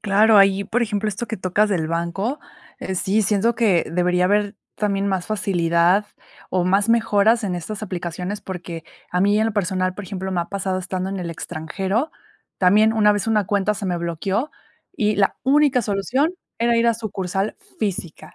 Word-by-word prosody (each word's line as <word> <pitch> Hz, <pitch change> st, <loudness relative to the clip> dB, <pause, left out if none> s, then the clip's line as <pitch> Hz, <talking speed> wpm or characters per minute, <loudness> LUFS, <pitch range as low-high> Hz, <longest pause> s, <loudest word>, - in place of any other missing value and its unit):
Claro, 210 Hz, +2 st, +4 dB
ahí, 195 Hz, 0 st, +4 dB
por 235 Hz, +4 st, 0 dB
ejemplo, 210 Hz, -1 st, -1 dB
esto 210 Hz, +4 st, -4 dB
que 220 Hz, -, -4 dB
tocas 190 Hz, +3 st, +1 dB
del 170 Hz, -6 st, 0 dB
banco, 170 Hz, -, -2 dB, 0.4 s
eh, 190 Hz, -, -4 dB
sí, 195 Hz, +4 st, +1 dB
siento 210 Hz, +4 st, +2 dB
que 205 Hz, -8 st, +2 dB
debería 180 Hz, +1 st, +1 dB
haber 205 Hz, +2 st, +1 dB, 0.2 s
también 200 Hz, -1 st, 0 dB
más 190 Hz, -2 st, -1 dB
facilidad, 180 Hz, -1 st, +2 dB, 0.4 s
o 180 Hz, -1 st, +1 dB
más 195 Hz, +4 st, +2 dB
mejoras 230 Hz, 0 st, +3 dB
en 185 Hz, -3 st, -1 dB
estas 210 Hz, +5 st, -6 dB
aplicaciones, 180 Hz, +1 st, -4 dB
porque 175 Hz, -4 st, -7 dB, 0.3 s
a 180 Hz, -, 0 dB
mí 205 Hz, +2 st, +3 dB
en 220 Hz, -, +2 dB
lo 225 Hz, -, -1 dB
personal, 185 Hz, -2 st, -1 dB
por 205 Hz, -, -7 dB
ejemplo, 190 Hz, +1 st, -5 dB
me 175 Hz, -, 0 dB
ha 170 Hz, -, -2 dB
pasado 190 Hz, -1 st, -2 dB
estando 185 Hz, +1 st, -3 dB
en 195 Hz, -, -4 dB
el 170 Hz, -2 st, -4 dB
extranjero. 190 Hz, -, -3 dB, 0.5 s
También 210 Hz, +4 st, +4 dB
una 210 Hz, -2 st, +4 dB
vez 205 Hz, +1 st, -2 dB
una 215 Hz, -3 st, +1 dB
cuenta 205 Hz, +1 st, +1 dB
se 200 Hz, -2 st, -5 dB
me 175 Hz, -1 st, -1 dB
bloqueó, 190 Hz, -, -2 dB, 0.5 s
y 210 Hz, -1 st, +1 dB
la 195 Hz, -1 st, +2 dB
única 275 Hz, -2 st, +3 dB
solución 240 Hz, -, 0 dB, 0.3 s
era 235 Hz, 0 st, +2 dB
ir 230 Hz, 0 st, +3 dB
a 230 Hz, -, +3 dB
sucursal 195 Hz, -2 st, -3 dB, 0.2 s
física, 185 Hz, -6 st, -4 dB
200 Hz, 185 wpm, -21 LUFS, 180-215 Hz, 0.5 s, Claro